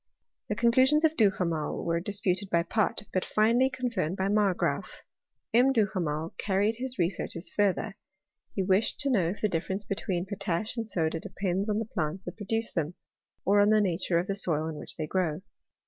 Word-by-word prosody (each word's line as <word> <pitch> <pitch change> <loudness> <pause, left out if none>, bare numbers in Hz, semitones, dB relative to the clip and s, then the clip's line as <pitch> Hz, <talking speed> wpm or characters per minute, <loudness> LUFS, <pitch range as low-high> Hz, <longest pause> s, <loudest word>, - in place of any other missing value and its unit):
The 210 - 0
conclusions 260 +7 +4
of 320 0 +2
Duhamel 180 - +1
were 170 0 +1
disputed 195 0 -1
by 170 -2 +2
Pott; 210 +3 0
but 185 - +1
finally 235 +5 +3
confirmed 235 - -2
by 190 +1 0
Margraaf. 205 -3 0 0.5
M. 250 +3 +5
Duhamel 175 - 0
carried 205 +3 +1
his 255 0 -5
researches 170 0 -1
further, 205 0 +1 0.6
he 195 - +1
wished 190 +3 +2
to 280 -1 +1
know 185 -9 +2
if 195 - -5
the 215 - +3
difference 190 +2 -2
between 190 -3 -2
potash 195 +1 -2
and 225 -2 -4
soda 165 -3 0
depends 195 +4 -2
on 210 - +1
the 225 - -1
plants 180 -2 -3
that - - -7
produce 225 +2 -2
them, 165 0 -2 0.5
or 205 +2 +4
on 205 - +4
the 215 0 +5
nature 185 -3 +1
of 170 - +1
the 195 - -1
soil 160 -5 +1
in 160 -2 -5
which - - -7
they 155 - -2
grow. 170 -1 -1
195 Hz, 180 wpm, -28 LUFS, 175-215 Hz, 0.6 s, M